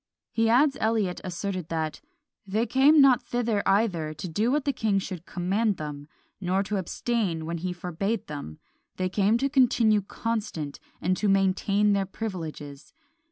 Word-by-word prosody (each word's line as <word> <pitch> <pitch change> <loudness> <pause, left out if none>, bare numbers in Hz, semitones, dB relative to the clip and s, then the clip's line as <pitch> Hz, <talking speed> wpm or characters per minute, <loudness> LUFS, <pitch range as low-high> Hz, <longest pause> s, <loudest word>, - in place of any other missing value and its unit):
He 225 0 +2
adds 270 +4 +4
Eliot 215 -5 0
asserted 185 -1 -4
that 160 -2 -3 0.5
"They 215 +4 0
came 275 +6 +5
not 260 -3 +6
thither 235 -4 -1
either 180 -7 +1
to 180 - -6
do 210 +8 0
what 290 0 0
the 280 - +1
king 215 -5 +1
should 185 -3 -5
command 195 +3 0
them, 145 -1 -6 0.3
nor 190 +1 0
to 205 +1 -2
abstain 190 -3 -2
when 170 +1 -3
he 180 +2 -3
forbade 180 +5 -3
them; 140 - -7 0.4
they 185 0 -1
came 205 +4 +2
to 270 +3 +1
continue 235 -6 +3
constant, 200 -9 -4 0.2
and 185 +2 +1
to 210 - +1
maintain 195 +2 +2
their 195 -1 0
privileges. 160 -9 -6
195 Hz, 160 wpm, -26 LUFS, 175-225 Hz, 0.5 s, not